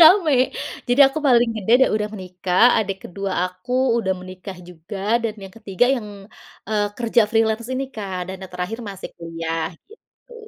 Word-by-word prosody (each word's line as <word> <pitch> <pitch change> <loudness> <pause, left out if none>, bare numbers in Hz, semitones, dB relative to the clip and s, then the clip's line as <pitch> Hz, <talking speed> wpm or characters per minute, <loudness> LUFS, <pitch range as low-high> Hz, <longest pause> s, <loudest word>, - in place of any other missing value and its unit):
ramai. 325 -4 +7 0.5
Jadi 245 +3 +3
aku 275 +3 -2
paling 240 -2 +5
gede 215 +2 0
dan - - +6
udah 210 0 -1
menikah, 185 0 -1 0.2
adik 195 -3 -1
ke-2 195 +1 -4
aku 185 +7 -7 0.3
udah 190 -4 0
menikah 185 +1 -9
juga, 175 +3 -9 0.3
dan 225 -2 -1
yang 190 - -12
ke-3 210 +1 +1
yang, 215 -3 -6 0.6
eee, 210 -1 +1
kerja 235 -1 +3
freelance 225 0 +1
ini 270 +1 -1
Kak 195 -4 -4
dan 190 - -5
yang 185 - -10
terakhir 180 +6 -3
masih 195 -1 -8
kuliah 165 -1 -3 0.2
gitu. 465 +2 -19
205 Hz, 165 wpm, -22 LUFS, 185-235 Hz, 0.6 s, ramai